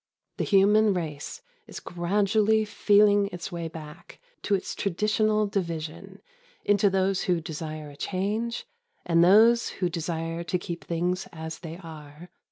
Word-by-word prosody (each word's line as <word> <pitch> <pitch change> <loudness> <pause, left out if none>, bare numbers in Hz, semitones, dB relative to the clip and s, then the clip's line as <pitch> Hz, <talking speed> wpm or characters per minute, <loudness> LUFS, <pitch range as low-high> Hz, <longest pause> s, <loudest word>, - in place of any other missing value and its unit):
The - - -1
human 205 +1 +4
race 155 -5 -5 0.2
is - - -8
gradually 205 +5 +1
feeling 205 -1 +4
its 175 +2 -6
way 170 -1 -4
back 155 -2 -11 0.2
to 205 - +1
its 190 - -4
traditional 215 +3 +1
division 170 -6 -5 0.4
into 205 0 +4
those 190 0 0
who 180 -2 +2
desire 155 -2 -6
a - - -14
change 210 +8 -2 0.4
and 170 0 +4
those 225 +6 +6
who 180 -2 -2
desire 165 0 -3
to 170 +2 -1
keep 175 -1 -6
things 175 +2 -2
as 160 0 -7
they 165 -1 -8
are. 160 -1 -11
180 Hz, 140 wpm, -26 LUFS, 165-205 Hz, 0.4 s, those